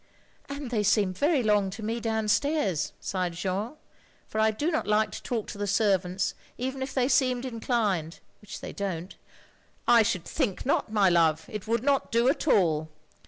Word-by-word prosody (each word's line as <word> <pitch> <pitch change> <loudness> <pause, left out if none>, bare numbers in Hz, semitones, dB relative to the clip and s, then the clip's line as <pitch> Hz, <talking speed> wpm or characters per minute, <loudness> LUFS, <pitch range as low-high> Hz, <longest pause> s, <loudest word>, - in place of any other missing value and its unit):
"And 280 -3 -6
they 220 -3 +1
seem 205 -2 +2
very 285 - +2
long 210 -2 +2
to 205 +4 -8
me 225 +2 -2
downstairs," 220 - 0
sighed 180 -2 -2
Jeanne. 190 - -3 0.3
" - - -33
For 215 - -3
I 220 - +4
do 290 +10 -1
not 315 - -1
like 210 +1 +2
to - - -7
talk 230 -4 -3
to 205 - -8
the 205 - -1
servants 195 -2 +1 0.2
even 265 +2 -3
if 265 0 -3
they 255 -2 +1
seemed 255 -1 +2
inclined 220 -9 -1
— - - -33
^which 210 - -8
they - - -7
don't—" 185 -3 -4 0.4
" - - -35 0.3
I 235 -1 +7
should 185 -5 0
think 200 -7 -2
not, 260 -4 0
my 205 -3 +4
love, 160 -2 +3
it 210 -1 -6
would 230 +1 0
not 280 0 +1
do 235 +1 +3
at 290 - -1
all. 160 - +3
215 Hz, 195 wpm, -27 LUFS, 190-245 Hz, 0.4 s, I